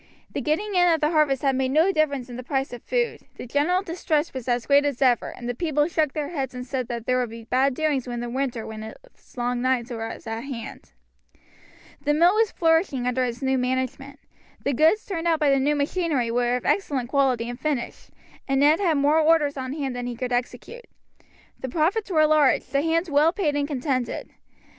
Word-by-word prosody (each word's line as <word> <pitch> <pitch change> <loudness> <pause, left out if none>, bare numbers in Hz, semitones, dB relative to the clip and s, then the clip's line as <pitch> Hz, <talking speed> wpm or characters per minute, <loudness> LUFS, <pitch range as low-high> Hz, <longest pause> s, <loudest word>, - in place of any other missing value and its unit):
The - - -3
getting 400 +8 -1
in 355 -1 +4
of 325 - +2
the 300 +1 +1
harvest 300 -4 +2
had 270 -1 +2
made 260 0 0
no 320 +8 +3
difference 285 -7 0
in 245 - -9
the 250 - -5
price 270 +1 -2
of 240 - -8
food, 485 -1 -1
the - - -8
general 300 +9 +1
distress 330 -3 -1
was 260 -2 -6
as 240 -1 0
great 285 0 +5
as 285 -4 -2
ever, 250 -3 +2
and 240 - -8
the 245 - -1
people 300 +1 0
shook 310 -4 0
their 295 -2 -3
heads 270 -6 -4
and 250 0 -6
said 255 -1 -3
that 235 -1 -5
there 255 0 +1
would 245 -2 -1
be 230 +1 -9
bad 260 +3 +1
doings 290 -4 0
when 240 -1 -4
the 240 - -4
winter 250 -2 -3
with 220 0 -7
its 235 - -14
long 245 0 -1
nights 255 -1 0
was 225 0 -6
at 225 0 -4
hand. 245 -5 -8 1.1
The 295 0 +2
mill 345 +4 +5
was 440 0 +2
flourishing 325 -6 +1
under 250 +1 +1
its 245 +2 -4
new 265 0 +1
management. 260 +2 -3 0.4
The 280 - 0
goods 320 - +3
turned 340 -4 -3
out 325 -2 +2
by 295 -3 +3
the 275 - +3
new 290 +3 +1
machinery 290 -4 0
were 245 +1 +1
of 250 - -4
excellent 270 -11 0
quality 260 -4 +1
and 245 +1 -6
finish, 290 -6 -3 0.4
and 270 -1 +1
Ned 300 +3 +5
had 340 -7 +2
more 290 +3 +3
orders 310 -2 +3
on 260 -1 -4
hand 275 -4 -3
than 245 0 -4
he 245 - -4
could 250 +1 -3
execute. 250 - -4 0.7
The 260 - -5
profits 355 - 0
were 310 -4 +4
large, 300 -3 +3
the 275 +2 0
hands 330 +2 0
well 295 +3 +4
paid 330 -6 -1
and 285 0 0
contented. 255 -4 -2
275 Hz, 220 wpm, -24 LUFS, 250-310 Hz, 1.1 s, great